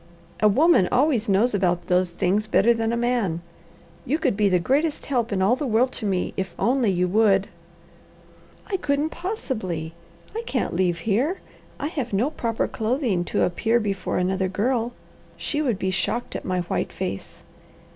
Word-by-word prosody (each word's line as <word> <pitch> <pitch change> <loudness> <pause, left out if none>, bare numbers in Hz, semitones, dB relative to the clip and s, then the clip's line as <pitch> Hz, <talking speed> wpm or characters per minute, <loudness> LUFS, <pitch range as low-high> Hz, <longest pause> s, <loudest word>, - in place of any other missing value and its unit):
A 215 - +5
woman 260 - +4
always 250 -4 +2
knows 215 +5 +3
about 175 -3 +1
those 180 0 +2
things 190 +5 0
better 220 +2 +4
than 225 0 -1
a 235 - 0
man. 235 -9 0 0.6
You 290 +6 0
could 265 -9 0
be 205 -1 +3
the 185 - +4
greatest 285 - 0
help 240 -5 0
in 190 -2 +1
all 215 +6 +4
the 290 +1 -3
world 245 +3 +2
to 220 - -4
me, 185 -2 -1
if 190 -2 -4
only 250 -2 +2
you 180 -1 +1
would." 200 0 +3 1.2
"I 390 - -2
couldn't 295 -1 0
possibly! 215 - -4 0.4
I 455 - -1
can't 255 - -1
leave 175 -1 +1
here. 250 - +1 0.4
I 290 - -2
have 270 - -4
no 240 +10 +1
proper 230 -6 -1
clothing 225 - 0
to - - 0
appear 225 +6 +1
before 200 -3 -2
another 185 +1 0
girl. 235 +5 0 0.4
She 300 - -2
would 245 -9 0
be 190 0 -1
shocked 195 +6 -2
at - - -5
my 185 -1 0
white 175 - -2
face. 185 - -6
220 Hz, 175 wpm, -24 LUFS, 190-255 Hz, 1.2 s, A